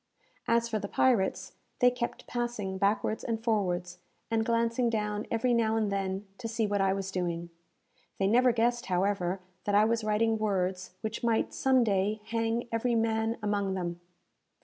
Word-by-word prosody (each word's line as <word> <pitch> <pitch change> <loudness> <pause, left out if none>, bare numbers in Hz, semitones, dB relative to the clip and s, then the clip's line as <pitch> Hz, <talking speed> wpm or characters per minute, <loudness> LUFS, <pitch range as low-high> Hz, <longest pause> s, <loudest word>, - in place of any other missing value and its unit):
As 235 0 +3
for 220 -2 -1
the 200 - -4
pirates, 225 -4 +1 0.2
they 250 0 +5
kept 240 -1 -4
passing 235 -6 -3
backwards 205 +2 +1
and 225 -1 -3
forwards, 180 -6 -1 0.3
and 225 -1 +2
glancing 230 +1 +1
down 210 -1 -2
every 235 +2 +1
now 225 -2 +2
and 215 -2 0
then, 195 0 -2
to 235 - -4
see 225 0 0
what 205 -1 0
I 195 0 +3
was 195 0 -2
doing. 170 -2 -3 0.7
They 195 - +1
never 245 +5 +5
guessed, 235 +1 +1
however, 185 0 0 0.2
that 205 - +1
I 210 +1 +6
was 230 0 +1
writing 220 +1 +1
words 185 -3 -1
which 220 +2 -4
might, 230 -1 +1
some 260 -2 +3
day, 210 0 0
hang 230 +1 -1
every 230 +1 +1
man 225 0 +1
among 200 -2 0
them! 175 -2 -4
215 Hz, 170 wpm, -29 LUFS, 195-230 Hz, 0.7 s, I